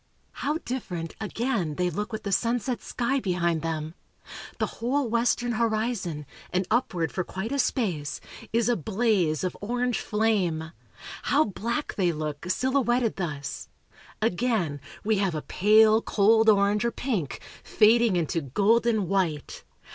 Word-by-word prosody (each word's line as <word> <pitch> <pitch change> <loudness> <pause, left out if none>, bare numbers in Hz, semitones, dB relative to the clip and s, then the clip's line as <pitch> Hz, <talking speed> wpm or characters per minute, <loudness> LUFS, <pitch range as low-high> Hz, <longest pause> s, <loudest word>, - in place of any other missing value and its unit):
How 295 +2 -2
different, 180 - -5
again, 215 - -1
they 180 +1 0
look 210 +7 -4
with 220 - -5
the 200 - -3
sunset 240 +4 0
sky 255 +3 -1
behind 175 -6 0
them! 160 -1 -3 0.6
The - - +1 0.2
whole 260 +3 +1
western 240 +1 +1
horizon, 220 -8 -1 0.3
and 185 +1 0
upward 180 - 0
for 185 - -2
quite 190 +7 -5
a 280 - -1
space, 170 - -1 0.3
is 230 0 +2
a 240 - +3
blaze 190 -4 +1
of 185 - -2
orange 245 +3 -1
flame! 190 -7 0 0.5
How 290 +2 +3
black 235 +6 -3
they 180 -3 +1
look, 155 +1 -5
silhouetted 250 0 +1
thus! 145 -6 -4 0.5
Again, 205 - 0 0.2
we 215 -1 +1
have 190 -5 0
a 155 - -3
pale, 215 +2 +5
cold 220 +2 +4
orange, 205 +1 +3
or 235 - +2
pink, 215 - -3 0.2
fading 225 -1 +4
into 165 -1 0
golden 210 - +2
white! 170 -6 -1
210 Hz, 140 wpm, -26 LUFS, 175-235 Hz, 0.6 s, pale